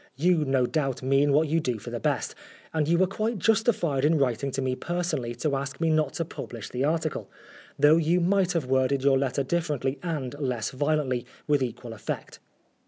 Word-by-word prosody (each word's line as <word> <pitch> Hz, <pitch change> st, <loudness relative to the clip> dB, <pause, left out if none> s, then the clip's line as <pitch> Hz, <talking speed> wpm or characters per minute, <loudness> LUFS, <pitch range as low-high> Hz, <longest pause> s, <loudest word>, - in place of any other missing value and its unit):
You 165 Hz, +2 st, +2 dB
no 135 Hz, -2 st, +2 dB
doubt 135 Hz, -2 st, -1 dB
mean 135 Hz, +2 st, +3 dB
what 155 Hz, +3 st, +3 dB
you 160 Hz, +3 st, +2 dB
do 125 Hz, -7 st, -1 dB
for 105 Hz, -, -8 dB
the -, -, -3 dB
best, -, -, -1 dB, 0.4 s
and 155 Hz, -2 st, +1 dB
you 170 Hz, +1 st, +3 dB
were 185 Hz, -, +4 dB
quite 215 Hz, +4 st, -2 dB
justified 200 Hz, -, +2 dB
in 155 Hz, +2 st, +4 dB
writing 135 Hz, 0 st, 0 dB
to -, -, -2 dB
me 130 Hz, -1 st, 0 dB
personally 170 Hz, -8 st, -2 dB
to 140 Hz, +4 st, -1 dB
ask 140 Hz, 0 st, -4 dB
me 165 Hz, -1 st, +2 dB
not 155 Hz, -3 st, +1 dB
to 165 Hz, -, -2 dB
publish 115 Hz, -8 st, -7 dB
the 125 Hz, +1 st, -2 dB
article, 155 Hz, +1 st, -1 dB, 0.5 s
though 150 Hz, +2 st, +6 dB
you 165 Hz, +2 st, +2 dB
might 185 Hz, +1 st, +2 dB
have 165 Hz, -6 st, 0 dB
worded 130 Hz, +1 st, +1 dB
your 135 Hz, -1 st, +4 dB
letter 135 Hz, +1 st, 0 dB
differently 145 Hz, -4 st, -1 dB
and 150 Hz, -7 st, -3 dB
less 125 Hz, -6 st, -2 dB
violently, 135 Hz, -3 st, 0 dB, 0.2 s
with 145 Hz, -2 st, +2 dB
equal 120 Hz, -2 st, -4 dB
effect. 110 Hz, -, -6 dB
145 Hz, 195 wpm, -27 LUFS, 130-165 Hz, 0.5 s, though